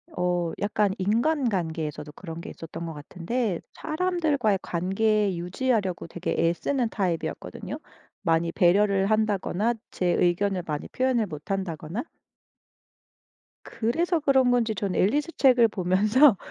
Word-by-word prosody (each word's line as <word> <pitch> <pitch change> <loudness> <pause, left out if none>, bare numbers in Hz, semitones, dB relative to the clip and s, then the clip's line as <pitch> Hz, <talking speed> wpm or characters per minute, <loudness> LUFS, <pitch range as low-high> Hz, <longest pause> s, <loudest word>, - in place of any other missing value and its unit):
어 175 -1 0
약간 205 -1 +1
인간관계에서도 190 - -1
그런 165 -1 -8
게 - - -8
있었던 165 +1 -7
것 165 - -5
같은데 180 - -3
사람들과의 310 - 0
관계 195 +3 +1
유지하려고 190 0 -1
되게 175 +1 -3
애쓰는 240 +8 0
타입이었거든요. 180 -6 -3 0.4
많이 165 -2 +1
배려를 195 +2 +3
한다거나 215 0 +1 0.2
제 180 - -1
의견을 180 +2 +1
많이 150 -2 -4
표현을 255 -3 +1
못 155 -2 -8
한다거나? 185 +1 -3 1.6
그래서 330 +10 0
그런 265 -4 +3
건지 235 -3 +2
저는 190 -1 -2
앨리스 290 - +2
책을 250 -4 +6
보면서 210 +6 +4
200 Hz, 305 characters per minute, -26 LUFS, 175-240 Hz, 1.6 s, 책을